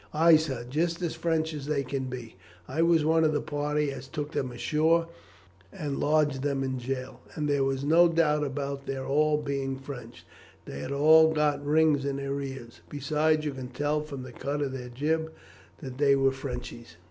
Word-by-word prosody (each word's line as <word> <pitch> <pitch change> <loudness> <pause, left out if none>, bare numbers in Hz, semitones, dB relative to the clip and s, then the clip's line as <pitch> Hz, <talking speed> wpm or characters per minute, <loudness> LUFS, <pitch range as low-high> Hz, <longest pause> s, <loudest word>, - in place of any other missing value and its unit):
"Ay, 165 +1 +7
sir, 135 -6 -1
just 165 +5 -1
as 170 - -1
French 160 -1 -1
as 145 -2 -6 0.2
can 135 0 -2
be. 125 -5 -7 0.3
I 150 +5 -1
was 165 -2 +4
one 160 +1 +3
of 155 -1 +3
the 150 - +1
party 150 0 -1
as 135 -1 -8
took 145 +2 -5
them 130 -5 -2
ashore 160 +6 +1 0.6
and 150 -7 -4
lodged 150 -3 +2
them 140 -1 -1
in 130 -1 -2
jail; 130 +1 -5 0.2
and 150 -1 -2
there 140 -1 +2
was 135 0 -1
no 165 +4 +6
doubt 155 -3 +2
about 140 0 -4
their 135 -1 -3
all 150 +2 +2
being 140 -2 -3
French. 125 -9 -10 0.4
They 70 - -7
had 70 - -5
all 160 +3 +6
got 150 -1 +1
rings 150 -1 +3
in 140 -1 -2
their 140 0 -3
ears; 130 -4 -8
besides, 150 +2 +1
you 145 - -2
could 130 -1 -8
tell 145 +2 0
from 140 -4 -7
the 130 - -9
cut 145 +4 -3
of 135 - -2
their 125 -2 -6
jib 160 +5 -1 0.5
that 130 -1 -7
they 140 -1 +5
were 135 0 +3
Frenchies." 125 -6 -7
145 Hz, 195 wpm, -28 LUFS, 135-155 Hz, 0.6 s, Ay